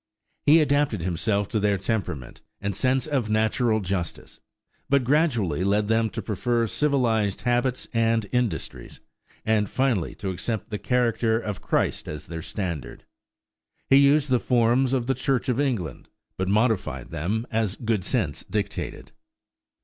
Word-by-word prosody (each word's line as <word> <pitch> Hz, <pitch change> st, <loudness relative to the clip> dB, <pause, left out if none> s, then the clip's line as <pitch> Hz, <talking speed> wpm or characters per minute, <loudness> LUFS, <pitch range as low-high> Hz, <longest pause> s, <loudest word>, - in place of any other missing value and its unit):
He 160 Hz, +3 st, +7 dB
adapted 145 Hz, -, +1 dB
himself 100 Hz, +4 st, 0 dB
to 110 Hz, -, 0 dB
their 100 Hz, -1 st, +2 dB
temperament 95 Hz, -, -3 dB, 0.2 s
and 100 Hz, -1 st, -3 dB
sense 130 Hz, +5 st, +1 dB
of 135 Hz, -8 st, -1 dB
natural 110 Hz, +1 st, +2 dB
justice, 90 Hz, -3 st, -4 dB, 0.5 s
but 140 Hz, -2 st, +3 dB
gradually 120 Hz, -, +1 dB
led 105 Hz, +2 st, +2 dB
them 115 Hz, 0 st, +2 dB
to -, -, -5 dB
prefer 115 Hz, +3 st, 0 dB
civilized 115 Hz, -6 st, +1 dB
habits 120 Hz, +1 st, 0 dB
and 115 Hz, -1 st, +2 dB
industries, 125 Hz, -9 st, -2 dB, 0.5 s
and 110 Hz, -2 st, +2 dB
finally 125 Hz, -10 st, 0 dB
to 95 Hz, -2 st, -4 dB
accept 105 Hz, +4 st, -4 dB
the 105 Hz, -, -3 dB
character 115 Hz, -2 st, +1 dB
of 105 Hz, -4 st, -5 dB
Christ -, -, 0 dB
as 75 Hz, -1 st, -6 dB
their 85 Hz, -1 st, -6 dB
standard. 85 Hz, -, -5 dB, 0.9 s
He 135 Hz, -, +8 dB
used 140 Hz, 0 st, +4 dB
the 125 Hz, -, +4 dB
forms 125 Hz, +2 st, +2 dB
of 125 Hz, -3 st, +1 dB
the 135 Hz, -, +1 dB
Church 135 Hz, 0 st, -1 dB
of 125 Hz, +1 st, +1 dB
England, 110 Hz, -, -2 dB, 0.3 s
but 95 Hz, -, -2 dB
modified 100 Hz, -, 0 dB
them 105 Hz, +10 st, -2 dB
as 110 Hz, -3 st, 0 dB
good 110 Hz, -5 st, -1 dB
sense 95 Hz, -, -1 dB
dictated. 105 Hz, +1 st, -4 dB
110 Hz, 145 wpm, -25 LUFS, 100-125 Hz, 0.9 s, He